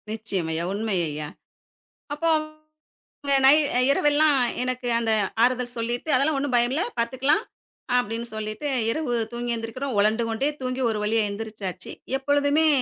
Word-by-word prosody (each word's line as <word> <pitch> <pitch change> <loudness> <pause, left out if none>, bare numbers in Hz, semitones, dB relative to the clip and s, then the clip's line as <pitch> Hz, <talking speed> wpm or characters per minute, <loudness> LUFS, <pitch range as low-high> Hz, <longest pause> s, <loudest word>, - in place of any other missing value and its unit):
நிச்சயம் 210 -6 -3
ஐயா. 160 +1 -2
உண்மை 215 0 -1
ஐயா. 150 0 -5 0.9
அப்போ 315 +3 -1 1.0
இங்க 280 0 +3
நை 270 - +9 0.4
இரவெல்லாம் 295 0 +3 0.2
எனக்கு 255 0 -3
அந்த 230 -1 0 0.3
ஆறுதல் 250 0 +1
சொல்லீட்டு, 240 +5 -3
"அதெல்லாம் 280 +4 +2
ஒண்ணும் 275 -2 0
பயமில்லை, 245 +7 +2 0.2
பார்த்துக்கலாம்." 260 - +1 0.5
அப்படீன்னு 230 0 -2
சொல்லீட்டு 215 +6 -4 0.2
இரவு 300 -2 -2 0.2
தூங்கி 240 0 -3
எந்திரிக்கிறோம். 230 +3 -4
உலண்டு 215 +3 +2
கொண்டே 225 +6 0
தூங்கி 255 0 -2
ஒரு 215 -1 -1
வழியா 220 +2 +2
எழுந்திரிச்சாச்சு. 200 -3 -6 0.2
எப்பொழுதுமே 285 +3 +2
240 Hz, 130 wpm, -24 LUFS, 220-280 Hz, 1.0 s, நை